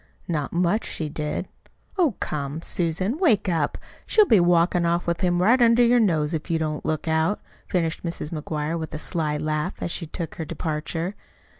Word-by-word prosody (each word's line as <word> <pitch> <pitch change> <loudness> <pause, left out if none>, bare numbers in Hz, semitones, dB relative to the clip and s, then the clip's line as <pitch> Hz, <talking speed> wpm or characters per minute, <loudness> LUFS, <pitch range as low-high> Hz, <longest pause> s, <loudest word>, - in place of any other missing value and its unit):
Not 150 -5 -2
much 180 +5 +1
she 155 -2 -3
did! 150 +4 -3 0.5
Oh, 335 - +2
come, 145 +2 -3
Susan, 185 - -1
wake 260 - +3
up! 160 -5 0 0.3
She'll 430 - +5
be 220 - +5
walkin' 175 0 +3
off 170 +1 +1
with 170 +2 -1
him 175 -2 +2
right 240 +6 +5
under 235 +1 +6
your 240 +1 +5
nose 165 -7 +2
if 160 +2 -3
you 165 - +2
don't 155 -1 -2
look 155 +1 -2
out," 160 +5 +1 0.3
finished 165 -4 -1
Mrs. 165 -3 -4
McGuire 155 0 -3
with 160 -1 -5
a - - -2
sly 150 -1 -1
laugh, 155 +4 -2
as - - -3
she 165 - -3
took 165 +1 -6
her 165 - -3
departure. 160 +4 -3
170 Hz, 185 wpm, -24 LUFS, 155-185 Hz, 0.5 s, under